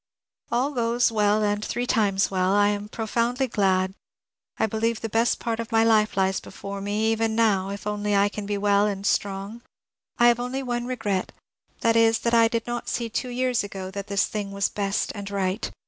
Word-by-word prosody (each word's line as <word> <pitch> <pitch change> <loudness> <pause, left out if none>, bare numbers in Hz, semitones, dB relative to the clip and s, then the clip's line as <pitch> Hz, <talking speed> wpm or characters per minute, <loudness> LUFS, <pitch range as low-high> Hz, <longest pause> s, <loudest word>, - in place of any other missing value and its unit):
All 250 +5 +1
goes 240 -2 +1
well 210 -1 +2
and 205 0 0
three 245 +3 -2
times 205 -6 +1
welL 185 0 +1
I 205 0 +4
am 205 0 -3
profoundly 235 +4 -1
glad. 190 -4 +1 0.6
I - - +2
believe 225 +1 -1
the 225 - -3
best 230 +2 +2
part 230 -1 -2
of 230 0 -5
my 225 0 +4
life 215 -2 +3
lies 190 0 +2
before 200 +1 -8
me, 210 +2 0
even 225 0 0
now, 205 -4 +2
if 200 0 -6
only 210 0 -1
I 200 0 +4
can 205 0 -6
be 205 0 -1
well 200 0 +3
and 200 -1 -4
strong. 200 +3 -1 0.6
I 240 - +5
have 240 0 +2
only 255 +2 -3
one 240 -1 -2
r^rot; 210 -7 -2 0.5
that 230 0 +3
is, 225 0 +4
that 235 - 0
I 230 -1 +6
did 230 0 -2
not 240 0 -4
see 235 -1 -2
two 250 +3 -3
years 250 -1 0
ago 190 -2 -6
that 200 0 -6
this 200 0 +1
thing 205 -2 -4
was 200 0 0
best 200 -1 -1
and 200 -1 -6
right. 195 +1 -2
215 Hz, 205 wpm, -25 LUFS, 200-230 Hz, 0.6 s, I